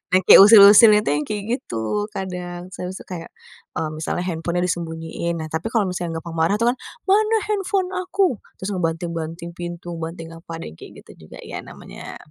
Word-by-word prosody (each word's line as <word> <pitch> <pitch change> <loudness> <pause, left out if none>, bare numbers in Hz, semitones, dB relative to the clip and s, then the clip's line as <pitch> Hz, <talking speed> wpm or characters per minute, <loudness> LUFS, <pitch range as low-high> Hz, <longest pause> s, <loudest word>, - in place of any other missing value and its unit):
yang 185 - +5
kayak - - +9
usil-usilnya 210 0 +8
itu - - 0
yang 150 - -2
kayak 210 -1 -4 0.2
gitu 115 - -6 0.3
kadang, 180 -2 -5
terus 180 +1 -6
tuh - - -12
kayak, 170 -2 -7 0.5
mmm, 155 -1 -2
misalnya 175 +3 -2
handphonenya 170 0 -2
disembunyiin. 165 -1 -3
Nah, 155 - -4
tapi 160 +6 -3
kalau 225 -3 +1
misalnya 175 -2 -4
gampang 170 0 -9
marah 165 +5 +2
tuh 230 +2 +1
kan, - - -15 0.3
"Mana 430 +3 +3
handphone 390 -2 -1
aku?" 365 - 0 0.2
Terus 190 - -5
ngebanting-banting 165 -1 -4
pintu 175 0 -7
banting 165 0 -7
apa 165 0 -13
deh - - -8
kayak - - -13
gitu 80 - -16
juga - - -11
ya - - -6
namanya - - -11
175 Hz, 180 wpm, -21 LUFS, 165-210 Hz, 0.5 s, kayak